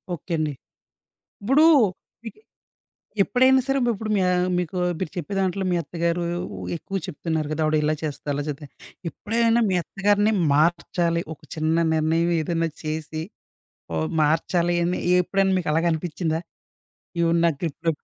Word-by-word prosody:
Okay 170 +2 -7
అండి. 155 -2 -1 0.9
ఇప్పుడూ 270 +9 +4 0.6
విహి 230 - -9 0.8
ఎప్పుడైనా 260 +4 +4
సరే 275 0 +1
ఉప్పుడు 215 0 -5
మీ 195 - +2
యా 180 - +2 0.3
మీకూ 180 0 -2 0.2
మీరు 185 - -3
చెప్పే 175 +3 -4
దాంట్లో 190 0 0
మీ 175 - +2
అత్తగారూ 170 +2 -1 0.5
ఎక్కువు 195 +4 -4
చెప్తున్నారు 160 -3 -3
గదా! 155 +1 -1
ఆవిడిలా 155 0 +2
చేస్తది, 150 -1 -4
అలా 145 - -2
చేద్ది. 145 0 -5 0.4
ఎప్పుడైనా 230 +6 +1
మీ - - +1
అత్తగారిని 205 +3 +1 0.2
మార్చాలి, 170 +2 +1
ఒక - - -29
చిన్న 160 0 0 0.2
నిర్ణయవేదన్నా 165 +1 +1
చేసి, 155 0 -4 0.7
ఓహ్ 80 0 0
మార్చాలి 170 +3 +1
అని 180 +1 0 0.2
ఎప్పుడైనా 195 +1 +1
మీకలాగా 165 +1 +1
అనిపిచ్చిందా? 160 0 -2 0.8
ఈవిడని 170 0 +2
నా - - +4
గ్రిప్‌లో 165 +1 -1
170 Hz, 130 wpm, -24 LUFS, 155-195 Hz, 0.9 s, ఇప్పుడూ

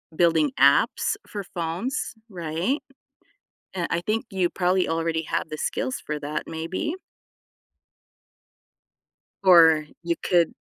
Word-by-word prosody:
building 160 -4 +3
apps 140 - +4
for 205 -1 -5
phones, 180 - -3 0.2
right? 175 - -2 1.0
Uh, 175 -2 -1
I 170 - +1
think 215 +5 -1
you 185 -3 0
probably 180 0 +1
already 165 0 0
have - - -2
the 155 - -5
skills 260 - -2
for 150 0 -3
that 150 +1 -3
maybe. 165 - -3 2.5
Or 165 -4 +7 0.2
you 170 0 0
could 175 -2 +2
170 Hz, 110 wpm, -25 LUFS, 160-190 Hz, 2.5 s, Or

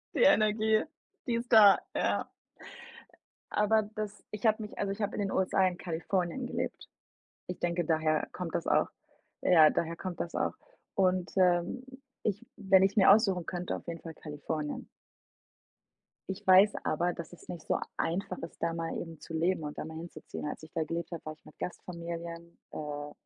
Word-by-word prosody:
die - - +4
Energie, 215 -4 +4 0.4
die 240 - +1
ist 235 +1 -4
da, 210 -4 +9 0.2
ja. - - +1 1.2
Aber 215 +1 +3
das 210 -1 -5
ich 210 +2 -5
habe 220 0 +4
mich 210 - -9
also, 200 -1 -1
ich 200 +3 -5
habe 205 0 -1
in - - -1
den 195 -1 -1
USA 190 0 +3
in 180 -1 -3
Kalifornien 180 +7 -2
gelebt. - - -4 0.6
Ich 180 - -5
denke, 175 0 0
daher 155 -1 +1
kommt 180 -3 -5
das 170 - -1
auch. - - +3 0.5
Ja, 160 -4 +7
daher 170 0 -1
kommt 180 0 -6
das 170 - -3
auch. - - 0 0.4
Und, 185 -1 +2
ähm, 180 +6 +2 0.4
ich 210 +2 -1
wenn 190 -2 +5
ich's 195 +3 +1
mir 195 -2 +7
aussuchen 195 -4 +4
könnte, 180 0 -3
auf - - -11
jeden 165 -1 -4
Fall 165 -1 -8
Kalifornien. 150 0 -5 1.4
Ich 190 - -5
weiß 190 +3 +8
aber, 175 +3 +1
dass 170 0 -8
es 175 - -15
nicht 170 -3 -7
so - - +2 0.2
einfach 175 +5 -1
ist, 165 - -8
da 165 0 +1
mal 165 0 -3
eben 165 -2 -8
zu 165 - -10
leben 165 +1 +1
und 150 0 -6
da - - -3
mal 160 0 -7
hinzuziehen. 160 -2 -7
Als 150 - -6
ich 155 - -12
da 165 - 0
gelebt 170 +2 -4
habe, 170 - -6
war 155 - -4
ich 155 - -24
mit - - -16
Gastfamilien, 170 -1 -6
äh, 145 -1 -5
175 Hz, 185 wpm, -31 LUFS, 165-200 Hz, 1.4 s, da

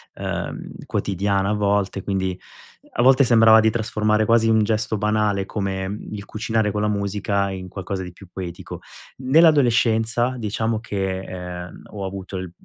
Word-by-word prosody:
ehm, - - -4 0.2
quotidiana 100 0 0
a - - +1
volte, 100 -1 0
quindi 95 -1 -2 0.6
a - - +1
volte 135 +2 +6
sembrava 115 -2 +6
di 110 - +4
trasformare 110 -1 0
quasi 115 0 +3
un 110 -1 +4
gesto 110 0 0
banale 105 -1 +1
come, 95 -2 -3
mhmm, 105 +2 -7
il 100 -1 -7
cucinare 110 0 -1
con 105 +1 -2
la 105 - +1
musica 100 -1 -1
in 95 -1 -6
qualcosa 95 0 -5
di 90 -1 -7
più 95 +2 -15
poetico. 90 -1 -7 0.4
Nell'adolescenza, 125 -5 +3
diciamo 110 0 -1
che, 95 -4 -3
ehm, 90 -2 -8
ho 100 -2 -5
avuto 95 0 -6
l 90 -2 -6
105 Hz, 155 wpm, -22 LUFS, 95-110 Hz, 0.6 s, volte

